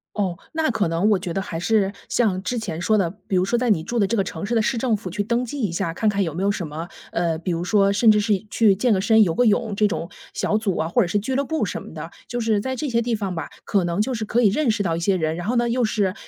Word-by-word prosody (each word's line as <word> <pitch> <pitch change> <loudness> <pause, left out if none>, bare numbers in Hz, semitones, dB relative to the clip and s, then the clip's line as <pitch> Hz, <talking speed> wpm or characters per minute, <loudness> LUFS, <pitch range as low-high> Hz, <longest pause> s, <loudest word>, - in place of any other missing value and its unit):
哦， 185 -4 -1
那 320 -2 0
可 215 -7 0
能 170 +6 +1
我 210 - +4
觉 180 -2 -4
得 195 - -1
还 165 - -5
是 200 +2 +1 0.2
像 200 -6 +1
之 245 - -2
前 175 -7 -5
说 215 +4 +2
的， 185 -5 +1 0.2
比 195 - -1
如 180 - +2
说 240 +5 +1
在 245 0 0
你 200 -7 +3
住 235 +9 -4
的 210 - +3
这 225 +4 -1
个 195 - +2
城 160 0 -5
市 225 - -2
的 225 - +3
市 235 +3 0
政 230 -1 +1
府 195 -3 -7
去 205 +4 -2
登 235 +4 0
记 275 +3 -5
一 205 -6 0
下， 170 -1 -2
看 215 +5 +1
看 200 -1 0
有 165 -5 -1
没 180 +5 -3
有 200 - +3
什 185 -5 -4
么， 160 +3 -6 0.2
呃， 170 -2 0
比 175 +3 -5
如 170 0 -2
说 200 +1 +3
甚 220 +2 +5
至 210 - +3
是 210 -1 0
去 210 -3 +4
健 240 +5 +1
个 195 - +3
身 220 +2 +5
游 170 -5 +1
个 245 - +2
泳 215 0 +2
这 210 +1 +3
种 170 -3 -4 0.2
小 210 - 0
组 210 -4 -1
啊， 160 - -1
或 240 - +3
者 190 - +1
是 175 - 0
俱 215 +6 -2
乐 275 +2 0
部 320 +3 -1
什 - - -4
么 - - -11
的， - - -7 0.2
就 240 0 -3
是 220 -2 +2
在 260 +5 -3
这 285 +3 -3
些 235 -1 +1
地 235 0 0
方 200 -3 -3
吧， 160 -3 -5
可 195 -4 +1
能 170 +3 0
就 255 +4 -1
是 225 -2 -3
可 235 +3 +1
以 215 - +5
认 275 +5 +1
识 215 -2 +1
到 165 -3 0
一 - - -2
些 190 +3 +1
人， 160 -2 -1
然 175 - -5
后 245 - 0
呢 240 0 +2
又 245 0 +1
是 205 -4 0
205 Hz, 345 characters per minute, -22 LUFS, 180-230 Hz, 0.2 s, 甚